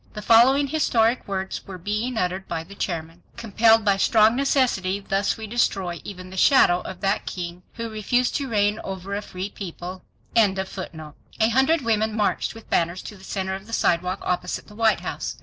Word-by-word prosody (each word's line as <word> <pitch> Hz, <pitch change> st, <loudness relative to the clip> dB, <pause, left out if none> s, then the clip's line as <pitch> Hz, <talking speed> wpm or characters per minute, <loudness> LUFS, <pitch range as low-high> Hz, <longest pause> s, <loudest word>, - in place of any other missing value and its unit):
The 210 Hz, -, -7 dB
following 255 Hz, +6 st, +6 dB
historic 250 Hz, -6 st, +1 dB
words 190 Hz, -1 st, -3 dB, 0.2 s
being 215 Hz, +5 st, -2 dB
uttered 185 Hz, 0 st, -1 dB
by 165 Hz, -1 st, -3 dB
the 190 Hz, +4 st, -13 dB
chairman: 170 Hz, -3 st, -4 dB, 0.2 s
"Compelled 225 Hz, 0 st, +3 dB
by 200 Hz, -1 st, +3 dB
strong 220 Hz, +2 st, +4 dB
necessity 250 Hz, -8 st, +1 dB
thus 195 Hz, +1 st, -1 dB
we 220 Hz, -, -6 dB
destroy 195 Hz, -6 st, -1 dB
even 185 Hz, -2 st, -9 dB
the 190 Hz, -, -8 dB
shadow 180 Hz, -6 st, +5 dB
of 185 Hz, -1 st, -8 dB
that 195 Hz, +2 st, 0 dB
king 175 Hz, -1 st, -5 dB
who 230 Hz, 0 st, -4 dB
refused 225 Hz, +3 st, 0 dB
to 275 Hz, -2 st, -4 dB
reign 210 Hz, -1 st, +1 dB
over 190 Hz, 0 st, -6 dB
a 205 Hz, -, -2 dB
free 190 Hz, 0 st, -6 dB
people." 185 Hz, -1 st, -7 dB, 0.3 s
A 190 Hz, -2 st, -1 dB
hundred 265 Hz, +7 st, +3 dB
women 220 Hz, -2 st, 0 dB
marched 210 Hz, +2 st, 0 dB
with 225 Hz, -, -12 dB
banners 170 Hz, +2 st, 0 dB
to 210 Hz, -, -8 dB
the 190 Hz, -, -16 dB
center 190 Hz, -1 st, -3 dB
of 195 Hz, +2 st, -7 dB
the 230 Hz, -, -10 dB
sidewalk 180 Hz, -1 st, +1 dB
opposite 180 Hz, 0 st, -2 dB
the 210 Hz, -, -15 dB
White 225 Hz, 0 st, +2 dB
House. -, -, -5 dB
200 Hz, 180 wpm, -24 LUFS, 185-225 Hz, 0.3 s, following